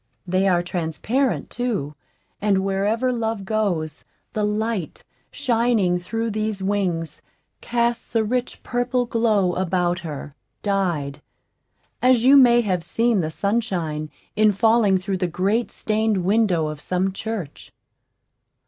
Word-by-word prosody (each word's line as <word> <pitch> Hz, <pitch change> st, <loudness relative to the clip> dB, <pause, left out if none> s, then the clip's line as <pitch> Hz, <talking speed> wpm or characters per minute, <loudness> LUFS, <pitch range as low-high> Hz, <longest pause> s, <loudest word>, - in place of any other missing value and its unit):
They 185 Hz, +2 st, +1 dB
are 175 Hz, -2 st, +3 dB
transparent 180 Hz, -, -1 dB
too; 215 Hz, -, -2 dB, 0.5 s
and 195 Hz, -2 st, +2 dB
wherever 210 Hz, +6 st, 0 dB
Love 225 Hz, -4 st, -2 dB
goes, 185 Hz, -8 st, -1 dB, 0.3 s
the 215 Hz, -, -1 dB
light, 210 Hz, -4 st, -2 dB, 0.3 s
shining 230 Hz, -9 st, +1 dB
through 225 Hz, +5 st, -3 dB
these 215 Hz, -1 st, -2 dB
wings, 185 Hz, -5 st, -1 dB, 0.4 s
casts 235 Hz, 0 st, -1 dB
a 225 Hz, -, +4 dB
rich 245 Hz, +3 st, -2 dB
purple 245 Hz, 0 st, 0 dB
glow 220 Hz, -6 st, +2 dB
about 180 Hz, -1 st, 0 dB
her 150 Hz, -4 st, -7 dB, 0.3 s
dyed, 170 Hz, -8 st, -1 dB, 0.8 s
as 250 Hz, -2 st, +4 dB
you 270 Hz, +2 st, +8 dB
may 240 Hz, -3 st, +7 dB
have 185 Hz, -6 st, -1 dB
seen 225 Hz, +4 st, +1 dB
the 155 Hz, -, -2 dB
sunshine 175 Hz, -6 st, -1 dB, 0.3 s
in 215 Hz, 0 st, +5 dB
falling 220 Hz, -1 st, +4 dB
through 190 Hz, +1 st, -2 dB
the 180 Hz, -1 st, 0 dB
great 200 Hz, +7 st, 0 dB
stained 215 Hz, -3 st, 0 dB
window 195 Hz, -5 st, +2 dB
of 150 Hz, -1 st, -7 dB
some 185 Hz, +1 st, -1 dB
church. 195 Hz, -7 st, -6 dB
205 Hz, 125 wpm, -22 LUFS, 180-230 Hz, 0.8 s, you